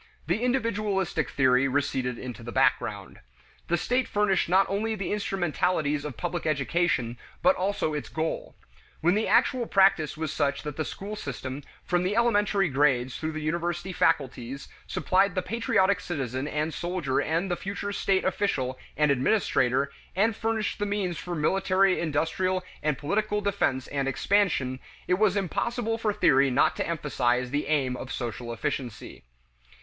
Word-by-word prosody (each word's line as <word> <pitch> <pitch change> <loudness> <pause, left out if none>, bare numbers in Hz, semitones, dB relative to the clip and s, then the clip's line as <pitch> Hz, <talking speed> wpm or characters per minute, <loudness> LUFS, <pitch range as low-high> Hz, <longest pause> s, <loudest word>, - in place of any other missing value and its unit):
The 175 +7 0
individualistic 210 - 0
theory 130 0 +3
receded 130 -3 -1
into 125 -1 -7
the 120 +1 -7
background. - - 0 0.5
The 175 - +2
state 250 +9 0
furnished 205 -4 +1
not 190 +2 +5
only 220 +3 -1
the 195 -1 -3
instrumentalities 175 -6 0
of 150 -5 -6
public 175 -1 -3
education 140 -4 0 0.2
but 275 +1 +5
also 190 -4 -1
its 150 - -4
goal. 160 0 -3 0.5
When 175 +3 +4
the 215 +2 +1
actual 245 -3 +3
practice 190 -7 +3
was 160 -2 -3
such 140 0 0
that 150 -2 -5
the 155 - -2
school 205 +2 -6
system, 135 - -5 0.2
from 175 -1 +1
the 185 +3 0
elementary 205 -4 +3
grades 135 -3 +2
through 160 0 -3
the 155 0 -4
university 175 +3 -2
faculties, 140 -5 0 0.2
supplied 185 +2 +2
the 185 - 0
patriotic 200 -3 +2
citizen 135 -6 -3
and 150 +1 -2
soldier 175 -7 -1
and 170 +4 -1
the - - +2
future 200 +2 -4
state 195 -1 +1
official 130 -10 -1 0.2
and 150 -1 +4
administrator 135 - +2 0.2
and 215 +3 +2
furnished 225 -1 -1
the 205 - 0
means 190 -5 -2
for 175 +1 -5
military, 190 +4 +2
industrial, 170 +4 0 0.2
and 150 -2 0
political 210 +7 0
defense 200 -10 0
and 140 -1 -2
expansion, 135 -5 +1 0.3
it 180 +1 +2
was 210 -2 +3
impossible 225 +4 -1
for 220 -2 +1
theory 140 -9 +4
not 130 +2 +3
to - - -2
emphasize 125 -6 0
the 145 0 -1
aim 140 -4 +1
of 130 +1 -7
social 120 -2 -4
efficiency. 120 -1 -4
170 Hz, 155 wpm, -27 LUFS, 140-200 Hz, 0.5 s, not